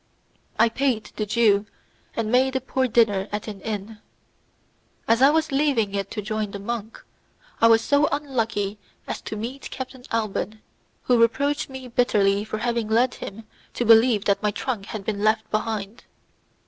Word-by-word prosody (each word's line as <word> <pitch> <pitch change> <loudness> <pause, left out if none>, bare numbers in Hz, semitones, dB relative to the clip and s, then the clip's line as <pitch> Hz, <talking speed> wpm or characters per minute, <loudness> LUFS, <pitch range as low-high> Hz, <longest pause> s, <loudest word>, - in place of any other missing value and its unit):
I 230 - +5
paid 230 -2 -1
the 215 - -2
Jew, 210 -1 +3 0.5
and 220 -1 -1
made 260 +1 +3
a - - +2
poor 260 0 -1
dinner 215 -4 +2
at 210 +1 -4
an 205 -3 -7
inn. 210 0 -5 1.1
As 230 +2 +3
I 270 - +8
was 315 0 +1
leaving 270 -8 +1
it 200 -1 -2
to 210 - -5
join 215 0 -2
the 200 - -6
monk, 220 +1 -5 0.6
I 230 - +7
was 225 0 +5
so 285 +4 +3
unlucky 225 -8 -2 0.3
as - - -5
to - - -6
meet 240 +6 -6
Captain 260 -1 -7
Alban, 215 -1 -2 0.4
who 245 -2 +3
reproached 285 +6 +1
me 265 -1 -8
bitterly 205 -5 +2
for 215 0 -4
having 235 0 -1
led 235 +4 +2
him 210 +3 -8 0.3
to 240 - -1
believe 225 -2 +5
that 200 -1 +2
my 210 - +1
trunk 210 -1 -4
had 210 -3 -6
been 205 -2 -2
left 220 0 +2
behind. 215 0 -3
225 Hz, 170 wpm, -24 LUFS, 210-250 Hz, 1.1 s, I